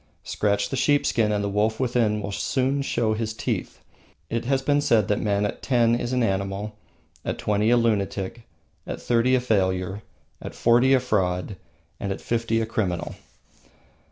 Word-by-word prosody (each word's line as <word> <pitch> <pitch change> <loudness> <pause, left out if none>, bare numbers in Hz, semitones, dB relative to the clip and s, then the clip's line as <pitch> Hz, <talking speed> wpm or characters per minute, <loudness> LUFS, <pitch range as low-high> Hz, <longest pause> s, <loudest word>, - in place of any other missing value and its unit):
Scratch 100 -1 0
the - - -2
sheepskin 125 -5 +2
and 105 -1 0
the - - 0
wolf 105 +2 0
within 120 -4 +1
us 105 - -5
will 100 - -4
soon 135 +6 0
show 115 -5 0
his 110 0 -3
teeth. - - -3 0.5
It 115 0 -2
has 135 +1 +1
been 145 +1 +2
said 115 -8 +3
that 105 - +1
a - - -4
man 100 -1 +1
at 105 - -4
ten 120 -3 +3
is 120 +1 -1
an 125 -1 +1
animal, 100 +1 -2 0.5
at - - -3
twenty 105 +1 +1
a 120 - +5
lunatic, 105 -1 -1 0.5
at - - -4
thirty 120 +2 +2
a - - +3
failure, 95 -4 0 0.4
at - - -8
forty 120 +3 +4
a - - +3
fraud, 95 -5 -1 0.4
and 100 - -3
at 95 - -3
fifty 115 -1 0
a 115 - 0
criminal. 100 -6 -2
110 Hz, 180 wpm, -24 LUFS, 100-120 Hz, 0.5 s, a